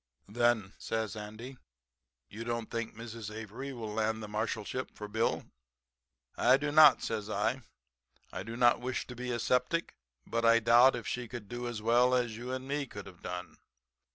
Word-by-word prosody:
"'Then,' 110 -2 +1
says 110 -1 -2
Andy, 110 +5 -8 0.7
'you 110 +2 -7
don't 115 -1 -3
think 115 -1 -3
Mrs. 115 -1 -7
Avery 110 +5 -6
will 115 -5 -6
land 110 0 0
the - - -5
Marshalship 110 +3 -3
for 105 - -7
Bill?' 110 +3 0 0.9
"'I 130 +2 +5
do 145 +1 -2
not,' 150 -2 +8
says 110 -2 -3
I. 110 +6 0 0.7
'I 95 - -4
do 115 +4 -6
not 120 0 +4
wish 125 0 -2
to 125 - -9
be 125 +1 -5
a 120 - 0
septic, 125 +8 0 0.3
but 115 0 -1
I 115 0 +6
doubt 120 +3 +6
if 120 -3 -6
she 125 -1 -3
can 115 -3 -8
do 120 +2 -5
as 115 -3 -5
well 120 +2 +4
as 120 -3 0
you 120 +3 -6
and 130 0 -4
me 140 0 -2
could 100 -4 -9
have 90 -3 -13
done.' 90 0 -6
115 Hz, 180 wpm, -31 LUFS, 110-125 Hz, 0.9 s, not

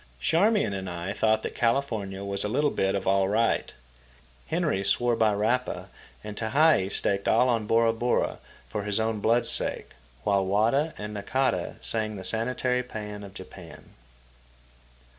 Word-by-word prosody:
Charmian 195 - +2
and 95 -1 -4
I 85 +3 -4
thought 110 0 +1
that - - -4
California 115 -6 -1
was 100 0 -1
a - - 0
little 145 +6 +1
bit 95 0 0
of 100 - -3
all 95 0 +3
right. 115 +3 +1 0.8
Henry 95 - 0
swore 120 +5 +2
by 110 -1 +3
Rapa, 110 +5 -1 0.3
and 105 -1 -7
Tehei 115 -3 +3
staked 100 0 0
all 125 - +4
on 115 -4 0
Bora 115 0 +3
Bora 120 +2 0 0.3
for 105 - -3
his 105 +1 0
own 110 -1 -1
blood's 115 +3 +3
sake; - - -1 0.3
while 100 -1 +2
Wada 115 +11 +1
and 105 0 -6
Nakata 130 +6 -1
sang 110 -1 -2
the 95 - -7
sanitary 125 +4 -1
pæan 105 -4 -7
of 100 -1 -11
Japan. 90 -2 -12
110 Hz, 155 wpm, -27 LUFS, 100-120 Hz, 0.8 s, all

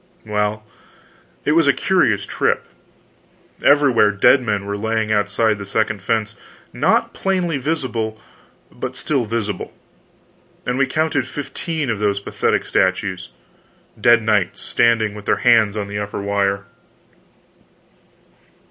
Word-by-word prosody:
Well, 105 0 -2 0.8
it - - +2
was 165 -1 +3
a 140 - +5
curious 120 - +1
trip. - - 0 1.0
Everywhere 140 -7 +5
dead 105 +6 +4
men 105 -4 -2
were 100 0 -3
lying 110 +1 -1
outside 110 +1 +1
the - - -5
second 105 0 -1
fence 110 +1 -1 0.4
not - - +1
plainly 180 -5 -1
visible, 125 -7 -2 0.5
but - - -6
still 135 -6 -1
visible; 110 -3 -3 0.9
and 125 +2 -1
we 135 - +3
counted 150 -2 0
fifteen 145 +1 -4
of 110 - -3
those 100 -1 0
pathetic 100 - -1
statues 95 -1 0 0.7
dead 120 -1 +5
knights 105 -5 +1
standing 115 -3 +1
with 105 -1 -10
their - - +2
hands 110 -4 +4
on 100 -1 -3
the 105 0 -4
upper 105 0 -4
wire. 100 0 -1
110 Hz, 125 wpm, -20 LUFS, 105-130 Hz, 1.0 s, a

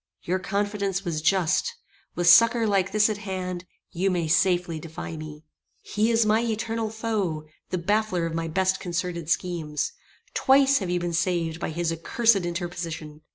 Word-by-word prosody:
Your 185 +2 0
confidence 200 0 -2
was 160 -3 -2
just. 185 - +1 0.4
With 175 - -1
succour 230 +7 +7
like 195 -3 +1
this 215 0 +4
at 215 -2 -3
hand 185 -3 -4 0.3
you 185 +2 0
may 175 -3 0
safely 175 0 +2
defy 160 +1 -7
me. 155 -1 -9 0.4
"He 215 +2 0
is 230 -1 +3
my 215 +1 +3
eternal 225 -1 -2
foe; 210 -8 -2 0.2
the 185 - -1
baffler 205 -1 0
of 165 - -3
my 165 0 -2
best 190 +3 +1
concerted 170 -2 -3
schemes. 165 -4 -1 0.4
Twice 275 +1 +4
have 190 -4 -4
you 180 0 +1
been 175 0 -3
saved 165 -2 0
by - - -3
his 170 +1 -1
accursed 195 +3 +2
interposition. 170 -3 -5
180 Hz, 160 wpm, -25 LUFS, 165-210 Hz, 0.4 s, succour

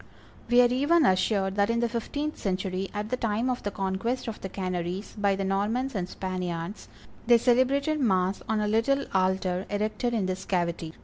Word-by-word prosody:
We 245 0 +6
are - - +6
even 295 +5 +4
assured 190 -1 +2
that 200 +1 +3
in 230 0 +1
the 235 - +2
fifteenth 285 +6 -3
century, 190 0 -2
at 210 0 -4
the 255 - -1
time 230 +2 0
of 250 - -3
the 205 - -2
conquest 195 +6 -2
of 225 - -5
the 190 - -5
Canaries 185 +1 -3
by 200 -2 +2
the 195 - -2
Normans 210 +7 0
and 185 -4 -3
Spaniards, 180 0 -4 0.4
they 240 -1 +7
celebrated 270 +6 +2
mass 190 -6 +1
on 220 -1 +1
a 210 - 0
little 250 +6 +2
altar 185 -1 +1
erected 215 +4 -1
in 210 -4 0
this 185 0 -3
cavity. 170 -3 -2
205 Hz, 185 wpm, -27 LUFS, 190-240 Hz, 0.4 s, they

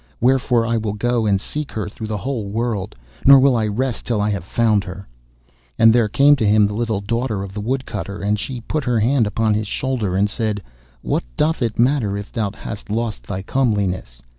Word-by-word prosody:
Wherefore 125 -1 +2
I 115 0 0
will 110 -2 -2
go 115 +1 0
and 100 -2 +2
seek 150 +8 -5
her 110 - -3
through 110 +1 -7
the 105 -1 -2
whole 115 0 -3
world, 110 -2 -2 0.3
nor 140 0 +9
will 135 -1 +4
I 110 -2 +1
rest 120 +4 -2
till 115 -3 -1
I 105 +1 +1
have 100 -4 -3
found 105 +1 +1
her.' 95 0 -9 0.7
And 115 0 +6
there 120 -2 +3
came 140 +6 +5
to 110 - +1
him 105 0 +5
the 105 - -2
little 110 -2 -1
daughter 115 -1 -2
of 95 -1 -8
the 105 - -4
Woodcutter, 110 -4 -3
and 105 +1 0
she 125 +2 -5
put 150 +5 -3
her 120 -3 +1
hand 120 +1 +2
upon 110 +1 +1
his 105 0 -1
shoulder 120 -7 -2
and 100 +2 +3
said, 105 -2 -2 0.4
'What - - 0
doth 160 0 +1
it 115 -2 -1
matter 120 -5 +2
if 100 0 -7
thou 105 -3 -1
hast 105 +1 -8
lost 110 +1 -3
thy 95 -1 -4
comeliness? 100 - -1
110 Hz, 215 wpm, -20 LUFS, 100-120 Hz, 0.7 s, nor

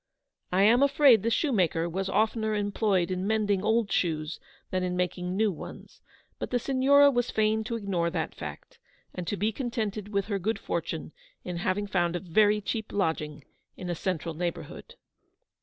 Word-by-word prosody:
I 185 +2 +3
am 235 +5 +5
afraid 280 -5 +6
the 230 - 0
shoemaker 185 - +1
was 190 +3 -3
oftener 220 +1 +1
employed 205 -3 +1
in 185 +1 -2
mending 205 -3 +1
old 220 0 +1
shoes 155 -2 -1 0.3
than 185 - 0
in 180 0 -2
making 180 +1 -2
new 215 -1 +3
ones, 165 - -10 0.4
but - - -4
the 250 - +1
Signora 275 +3 +5
was 245 -2 0
fain 220 0 +1
to 230 - -3
ignore 190 -6 -1
that 165 -2 -3
fact, - - -9 0.3
and 180 -2 -6
to 205 - -2
be 210 +4 +1
contented 215 -4 -3
with 200 -2 0
her 200 -2 -2
good 220 +5 -1
fortune - - -4 0.3
in 180 -1 -4
having 185 +4 -1
found 175 -4 0
a - - -1
very 210 +5 +3
cheap 220 +2 -3
lodging 155 -6 -2 0.3
in 180 -1 -4
a - - 0
central 170 -1 -2
neigh 175 +2 0
bourhood. - - -11
200 Hz, 175 wpm, -28 LUFS, 180-220 Hz, 0.4 s, afraid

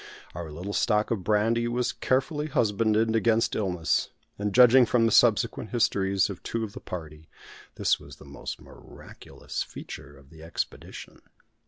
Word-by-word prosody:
Our 85 -1 -6
little 90 +7 -6
stock 105 0 +1
of 105 -5 -1
brandy 115 +3 +1
was 120 +1 -1
carefully 150 +4 -1
husbanded, 110 -3 +1
against 115 0 +2
illness; 90 -6 0 0.3
and, 105 0 -1
judging 125 +1 +7
from 115 +1 +3
the 115 - +2
subsequent 115 -1 +3
histories 100 -5 +1
of 100 -4 -8
two 115 -1 -3
of 105 -2 -6
the - - -8
party, 80 -3 -9 0.5
this - - +1
was - - -12
the - - -16
most - - -7
miraculous - - -9
feature 70 0 -9
of 70 +1 -20
the 80 -1 -14
expedition. 80 +1 -6
110 Hz, 155 wpm, -27 LUFS, 90-115 Hz, 0.5 s, judging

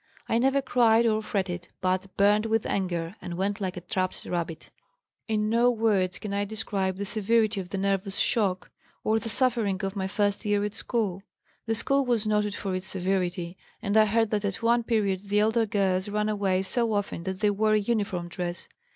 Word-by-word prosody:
I 230 - +2
never 270 +2 +2
cried 235 -3 +4
or 215 -1 +2
fretted, 185 -5 -3
but 185 0 0
burnt 210 +2 +4
with 225 -1 +1
anger 175 -2 -2
and 170 -1 -6
went 200 +2 -1
like 185 -2 -3
a - - -5
trapped 185 +1 -3
rabbit. 170 -2 -4 0.6
"In 215 -1 0
no 235 +3 +4
words 210 -6 +1
can 210 -2 -5
I 200 0 0
describe 200 -3 -2
the 200 - -3
severity 215 0 +1
of 180 - -10
the 195 - -3
nervous 195 0 -1
shock, 195 -6 0 0.3
or 220 +1 +2
the 225 - -4
suffering 230 -6 +2
of 195 +1 -2
my 190 -1 -1
first 205 +1 0
year 205 -1 +1
at 205 0 -2
school. 210 -6 -2 0.5
The 225 - +1
school 275 +5 +1
was 240 -4 +1
noted 210 -1 +1
for 195 -2 -3
its 185 0 -3
severity 180 -1 -2 0.2
and 205 -2 -2
I 215 0 +7
heard 225 +1 +1
that 210 -1 0
at 200 +2 -3
one 235 +1 +4
period 205 -4 -1
the 205 +1 +3
elder 220 +1 +2
girls 195 -1 0
ran 210 +1 0
away 195 -3 +1
so 230 +3 0
often 205 -4 -2
that 190 +1 -4
they 210 -1 +4
wore 215 +1 +2
a - - +5
uniform 200 -5 -1
dress. 175 0 -5
205 Hz, 200 wpm, -27 LUFS, 190-220 Hz, 0.6 s, I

